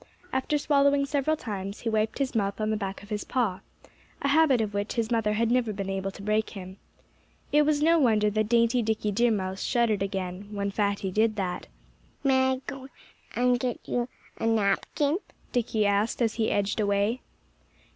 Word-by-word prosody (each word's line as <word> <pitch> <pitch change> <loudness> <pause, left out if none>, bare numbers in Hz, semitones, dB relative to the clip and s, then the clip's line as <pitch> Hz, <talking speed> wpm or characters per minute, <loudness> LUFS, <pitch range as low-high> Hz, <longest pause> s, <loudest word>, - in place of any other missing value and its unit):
After 265 +3 +1
swallowing 280 -1 +3
several 285 +2 0
times 200 -4 -5
he 230 - -1
wiped 215 0 0
his 275 -2 -1
mouth 200 -3 -1
on 215 0 0
the - - +1
back 195 -2 -4
of 205 - -14
his 210 -1 -2
paw 220 -8 -1 0.6
a 280 - +2
habit 285 -4 +4
of 215 -2 -1
which 205 +1 -2
his 230 -1 -1
mother 225 -2 +1
had 230 +2 +1
never 245 -3 +2
been 195 -1 -4
able 195 0 -2
to 195 +1 -10
break 215 +1 +1
him. 190 -1 -9 0.7
It 295 0 +4
was 300 -1 +2
no 330 +1 +5
wonder 215 -6 +3
that 215 0 0
dainty 235 +1 +3
Dickie 215 -1 -1
Deer 235 +4 +3
Mouse 190 -3 -2
shuddered 230 -4 +1
again, 190 0 -3
when 200 -1 -2
Fatty 200 -2 -1
did 215 +2 +2
that. 185 -4 -3 0.6
"May 260 -1 +3
I - - 0
go 270 -1 -7 0.5
and 245 0 +3
get 245 -1 -2
you 245 0 -1 0.3
a 225 - 0
napkin?" 225 - +1 0.3
Dickie 225 -3 +1
asked, 205 +2 +1
as 230 -2 +2
he 225 -1 0
edged 205 +1 0
away. 205 +4 +1
220 Hz, 185 wpm, -27 LUFS, 200-250 Hz, 0.7 s, no